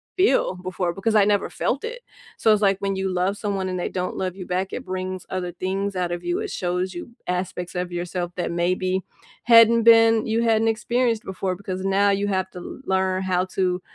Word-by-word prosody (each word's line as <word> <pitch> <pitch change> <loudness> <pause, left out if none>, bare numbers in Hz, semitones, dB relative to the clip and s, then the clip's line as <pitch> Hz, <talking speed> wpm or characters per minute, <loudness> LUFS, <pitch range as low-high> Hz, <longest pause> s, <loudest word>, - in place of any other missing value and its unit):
feel 370 - +3
before 180 -1 -3
because 215 +4 -1
I 205 -2 +6
never 205 -1 +1
felt 275 - -2
it. 485 +2 -5 0.4
So, 220 - +4
it's, 210 - +1
like, 195 -2 +3
when 195 0 -1
you 190 0 -1
love 185 +2 0
someone 200 -2 -2
and 185 -1 -3
they - - -2
don't 180 -1 -3
love 185 -1 -3
you 190 -2 -7
back, 185 +1 -2
it 255 - -5
brings 185 0 -4
other 180 -1 -3
things 190 +3 -3
out 180 -1 -1
of 175 0 -4
you, 350 +1 -1
it 430 -2 -4
shows 180 +1 -2
you 175 - -7 0.2
aspects 180 0 -3
of 180 0 -3
yourself 175 0 -3
that 175 -2 -2
maybe 185 +2 0 0.4
hadn't 230 0 +7
been 225 -1 +6
you 225 +1 +1
hadn't 225 -1 +3
experienced 230 +1 0
before 190 -1 -3
because 190 0 -5
now 195 +1 +3
you 200 +1 0
have 190 -1 -1
to 180 +8 -9
learn 190 0 0
how 185 -1 +1
to 185 -1 -1
190 Hz, 210 wpm, -23 LUFS, 180-215 Hz, 0.4 s, hadn't